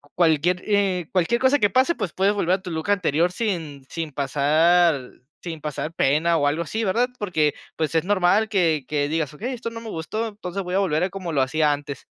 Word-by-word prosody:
cualquier, 175 +1 +2
eh, 195 -5 +1
cualquier 190 +7 +1
cosa 270 +2 +4
que 205 - +3
pase, 260 - +2
pues, 175 - -4
puedes 195 +2 +2
volver 185 -3 +1
a 190 - -7
tu 180 -2 -7
look 160 +4 -4
anterior 175 -3 +2
sin 165 - -3
sin 165 -3 -5
pasar 150 +2 +2 0.3
sin 165 -3 -6
pasar 150 +1 -4
pena 160 +5 +2
o 145 - +2
algo 155 +4 0
así, 220 +6 -3
¿verdad? 240 +6 +1
Porque, 160 -7 +1 0.2
pues, 155 -1 -2
es 160 - +2
normal 200 +2 +3
que 165 -9 +1
que 145 -1 -1
digas: 160 -2 -1
"Okey, 240 - -4
esto 235 -1 -5
no 230 0 -8
me 225 - -8
gustó, 215 +7 -3
entonces 195 -2 -6
voy 180 0 -5
a 195 - +3
volver 170 -4 +1
a 190 - 0
como 185 -3 -6
lo 140 - +2
hacía 150 +3 +2
antes". 145 -2 -7
175 Hz, 215 wpm, -23 LUFS, 155-200 Hz, 0.3 s, cosa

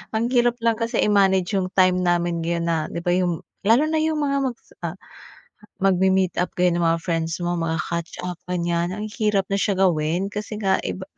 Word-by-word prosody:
Ang 235 +3 0
hirap 240 -1 +3
lang 230 -1 +3
kasi 230 0 -1
i-manage 190 -3 +3
yung 185 - -1
time 185 -1 +4
namin 175 -1 +1
ngayon 170 0 -1
na 165 - +1
'di 170 - -4
ba, 175 - +1
yung 175 -3 0 0.2
lalo 230 +9 +4
na 315 0 +1
yung 315 0 0
mga 280 -1 +1
mag, 250 -3 -2 0.3
ah, - - -4 0.9
magmi-meet 190 -1 +2
up 180 - -2
kayo 180 0 +3
ng 175 - -1
mga 165 0 +2
friends 165 0 -2
mo 175 0 0
magka-catch 165 +1 -3
up 180 -1 -5
ganiyan. 170 0 -1
Ang 210 +1 -4
hirap 210 -3 +1
na 195 - +2
siya 200 -1 +1
gawin 175 0 +1
kasi 210 +1 -5
nga 195 -1 +2
iba 190 - -4
185 Hz, 200 wpm, -23 LUFS, 170-210 Hz, 0.9 s, time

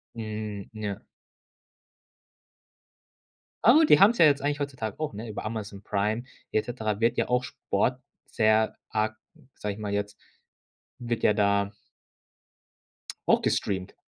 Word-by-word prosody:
Mhm. 110 -3 -5
Ja. 105 -3 -5 2.6
Au, 275 +8 +7
die - - +6
haben's 210 +5 +6
ja 165 - +8
jetzt 140 -2 +3
eigentlich 145 +1 -1
heutzutage 130 -5 -4
auch, 155 -8 -2
ne? 110 +3 -6
Über 105 - -6
Amazon 105 -3 -5
Prime 105 +3 -1 0.3
et 110 - +1
cetera 110 -4 -3
wird 115 +1 +2
ja - - 0
auch 125 0 +2
Sport 125 0 -1 0.3
sehr 110 0 +2
arg- 110 0 0 0.4
sag 105 - -3
ich 100 - -10
mal 105 -1 -4
jetzt- 105 0 -3 0.8
wird 120 -2 -3
ja - - +5
da 100 -1 +2 1.6
auch - - +5
gestreamt. 95 -2 -1
110 Hz, 130 wpm, -27 LUFS, 105-125 Hz, 2.6 s, ja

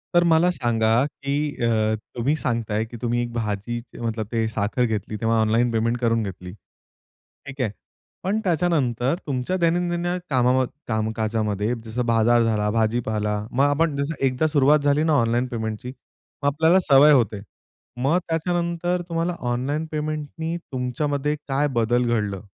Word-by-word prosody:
तर 175 - +6
मला 170 +1 +4
सांगा 120 -2 +2
की 140 -1 -5 0.3
अ, 110 -1 +2 0.2
तुम्ही 135 +6 +1
सांगताय 115 -5 -1
की 120 +1 -10
तुम्ही 120 0 0
भाजीचे 115 +2 -4
मतलब 110 -2 -2
ते 115 -1 0
साखर 110 +3 0
घेतली 110 -1 -3
तेव्हा 115 0 +2
ऑनलाईन 115 +2 +2
पेमेंट 115 +1 0
करून 115 -2 +1
घेतली, 90 -2 -7 0.9
ठीक 140 -1 -6
आहे. 110 -5 0 0.5
पण 205 +4 0
त्याच्यानंतर 155 - +1
तुमच्या 135 +7 -1
दैनंदिन 175 0 0 0.2
कामाम 130 0 +3 0.2
कामकाजामध्ये 110 -1 -1
जसं 120 +2 -2
बाजार 115 +1 +3
झाला, 105 -2 +1
भाजीपाला 110 -2 0
मग 135 +3 +2
आपण 145 +1 +1
जसं 140 +3 -2
एकदा 130 +4 +1
सुरुवात 150 0 +4
झाली 145 +1 +2
ना 160 -1 +2
ऑनलाईन 120 +2 +1
पेमेंटची 115 0 -4
मग 140 +2 -9
आपल्याला 160 +6 +4
सवय 140 +2 +7
होते. 110 -7 +2 0.6
मग 140 +8 +2
त्याच्यानंतर 170 +1 -1
तुम्हाला 170 +1 -1 0.2
ऑनलाईन 145 +6 -1
पेमेंटनी 155 +2 -3 0.2
तुमच्यामध्ये 140 +3 -1
काय 140 +1 +1
बदल 120 +1 +2
घडलं? 105 -3 -1
125 Hz, 140 wpm, -23 LUFS, 115-150 Hz, 0.9 s, सवय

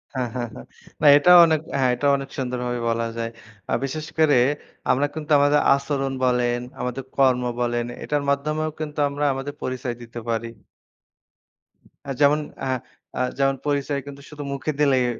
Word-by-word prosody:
হ্যাঁ, 125 -2 -1
হ্যাঁ, 120 -1 -2
হ্যাঁ। 60 - -10 0.4
না - - +1
এটাও 180 +4 +7
অনেক, 160 -2 +1 0.2
হ্যাঁ, 130 -1 +3
এটাও 140 +3 +2
অনেক 135 0 -7
সুন্দরভাবে 125 -2 -2
বলা 115 0 0
যায়। 115 0 -2 0.4
আ - - +2
বিশেষ 150 +3 -3
করে 155 -5 +5 0.5
আমরা 135 +3 +2
কিন্তু 155 -1 -6
আমাদের 145 +1 +4 0.2
আচরণ 140 -1 -2
বলেন, 125 -1 +1 0.2
আমাদের 125 +1 -3
কর্ম 130 -2 +4 0.2
বলেন, 120 0 0 0.2
এটার 145 -1 -1
মাধ্যমেও 150 +2 0
কিন্তু 150 -1 -5
আমরা 145 +1 -2
আমাদের 135 +2 -5
পরিচয় 130 -1 -3
দিতে 120 0 -8
পারি 115 0 -1 1.7
যেমন, 145 +1 +5 0.3
হ্যাঁ, 130 -1 -1 0.4
আ - - 0 0.2
যেমন 135 0 +2
পরিচয় 145 0 0
কিন্তু 140 0 -10
শুধু 150 -1 -8
মুখে 140 +2 -2
দিলেই 135 -4 +3
135 Hz, 160 wpm, -23 LUFS, 125-145 Hz, 1.7 s, এটাও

